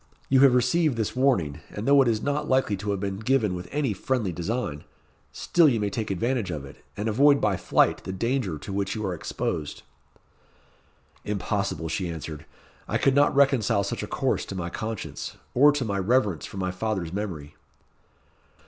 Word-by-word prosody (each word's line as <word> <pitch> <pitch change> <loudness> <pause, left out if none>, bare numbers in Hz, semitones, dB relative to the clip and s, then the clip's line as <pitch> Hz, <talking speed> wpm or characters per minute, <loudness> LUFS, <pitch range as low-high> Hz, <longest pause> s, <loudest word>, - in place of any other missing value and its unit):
"You 135 - +5
have 135 -2 +6
received 130 +2 +2
this 110 +1 -2
warning, 120 - +1
and 105 +4 -6
though 140 0 +6
it 130 - +3
is 110 -2 0
not 145 +1 -1
likely 130 -5 +2
to 105 +2 -5
have 100 -1 0
been 100 0 -3
given 110 -3 +1
with 90 0 -6
any 140 -6 0
very 95 - -16
friendly 120 -8 0
design, 85 -3 -3 0.5
still 170 -3 +3
you 120 -4 0
may 105 -1 -1
take 110 0 -3
advantage 115 +2 -1
of 75 -5 -4
it, 70 - -14
and 105 +2 -2
avoid 140 +6 +5
by 105 -2 +1
flight 85 - +2
the - - -5
danger 115 - -1
to 95 - -7
which 100 +1 -1
you 110 -1 -3
are 95 - -1
exposed." 80 -2 -4 1.4
"Impossible," 100 -4 -2
she 85 +2 -2
answered. 80 -2 -7 0.4
"I - - 0
could 135 - +3
not 145 +1 +3
reconcile 135 -8 +3
such 100 - -3
a - - -4
course - - 0
to 95 - -7
my 85 -2 -4
conscience, 110 0 -5 0.2
or 145 +4 +6
to 140 -4 -1
my 100 -2 -1
reverence 105 -4 +1
for - - -10
my 95 -1 -1
father's 90 -3 -3
memory." 85 -8 -5
105 Hz, 190 wpm, -26 LUFS, 90-130 Hz, 1.4 s, have